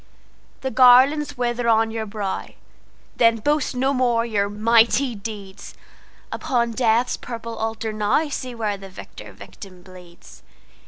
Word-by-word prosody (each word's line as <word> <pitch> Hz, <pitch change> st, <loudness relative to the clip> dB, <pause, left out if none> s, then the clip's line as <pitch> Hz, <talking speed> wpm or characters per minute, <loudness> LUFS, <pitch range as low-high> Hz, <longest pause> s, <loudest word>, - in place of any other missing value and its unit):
The 265 Hz, -, -3 dB
garlands 260 Hz, +3 st, +5 dB
wither 240 Hz, -1 st, -1 dB
on 225 Hz, 0 st, +3 dB
your 220 Hz, -1 st, -4 dB
brow:Then 215 Hz, +2 st, -3 dB
boast 290 Hz, +3 st, -1 dB
no 265 Hz, +2 st, +1 dB
more 240 Hz, -3 st, +1 dB
your 205 Hz, -3 st, -1 dB
mighty 230 Hz, +5 st, +2 dB
deeds; 200 Hz, -2 st, -9 dB, 0.6 s
Upon 235 Hz, -2 st, -1 dB
Death's 235 Hz, +1 st, +1 dB
purple 230 Hz, -1 st, -7 dB
altar 225 Hz, 0 st, -4 dB
nowSee 250 Hz, +4 st, -1 dB
where 210 Hz, -3 st, -2 dB
the 195 Hz, 0 st, -11 dB
victor 185 Hz, -, -11 dB
victim 185 Hz, -3 st, -13 dB
bleeds. 180 Hz, -2 st, -16 dB
230 Hz, 120 wpm, -22 LUFS, 210-250 Hz, 0.6 s, garlands